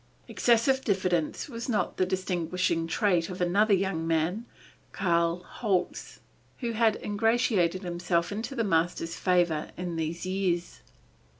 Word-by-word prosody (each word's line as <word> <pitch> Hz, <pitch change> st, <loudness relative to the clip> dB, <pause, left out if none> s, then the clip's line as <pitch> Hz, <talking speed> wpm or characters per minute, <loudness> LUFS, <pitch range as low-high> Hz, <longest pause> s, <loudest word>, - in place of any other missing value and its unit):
Excessive 245 Hz, +3 st, +2 dB
diffidence 185 Hz, -5 st, 0 dB
was 235 Hz, -2 st, -6 dB
not 220 Hz, -, 0 dB
the 185 Hz, -, +2 dB
distinguishing 180 Hz, -2 st, -1 dB
trait 175 Hz, -1 st, +1 dB
of 185 Hz, -, -6 dB
another 200 Hz, +4 st, +3 dB
young 185 Hz, -4 st, -1 dB
man, 165 Hz, +8 st, 0 dB, 0.5 s
Karl 170 Hz, -1 st, +1 dB
Holz, 190 Hz, -3 st, -2 dB, 0.4 s
who 240 Hz, -3 st, -3 dB
had 225 Hz, -1 st, +3 dB
ingratiated 205 Hz, -4 st, +1 dB
himself 175 Hz, 0 st, -1 dB
into 225 Hz, +6 st, -4 dB
the 230 Hz, -, 0 dB
master's 165 Hz, -2 st, 0 dB
favor 175 Hz, -4 st, +1 dB
in 175 Hz, -2 st, -4 dB
these 165 Hz, +2 st, -3 dB
years. 185 Hz, -, -1 dB
180 Hz, 125 wpm, -28 LUFS, 170-210 Hz, 0.5 s, another